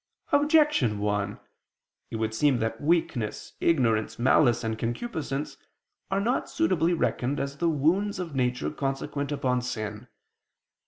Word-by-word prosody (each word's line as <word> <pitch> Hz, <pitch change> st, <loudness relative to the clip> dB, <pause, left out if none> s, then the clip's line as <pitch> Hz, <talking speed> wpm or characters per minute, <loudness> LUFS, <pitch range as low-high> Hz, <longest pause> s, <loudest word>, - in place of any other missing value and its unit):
Objection 295 Hz, -, +4 dB
1: 105 Hz, 0 st, -1 dB, 0.7 s
It -, -, -6 dB
would 110 Hz, 0 st, -1 dB
seem 135 Hz, +3 st, +3 dB
that 115 Hz, -1 st, -2 dB
weakness, 145 Hz, -9 st, 0 dB
ignorance, 115 Hz, -9 st, +2 dB
malice 120 Hz, -1 st, +4 dB
and 110 Hz, 0 st, -2 dB
concupiscence 140 Hz, -, -3 dB, 0.5 s
are 195 Hz, 0 st, +1 dB
not 235 Hz, +6 st, 0 dB
suitably 180 Hz, -, +1 dB
reckoned 140 Hz, -3 st, 0 dB
as 140 Hz, 0 st, -3 dB
the 170 Hz, +1 st, +1 dB
wounds 170 Hz, +8 st, +1 dB
of 175 Hz, -4 st, -5 dB
nature 125 Hz, -2 st, 0 dB
consequent 140 Hz, 0 st, -3 dB
upon 125 Hz, -3 st, 0 dB
sin. 110 Hz, -4 st, -5 dB
135 Hz, 125 wpm, -27 LUFS, 115-165 Hz, 0.7 s, Objection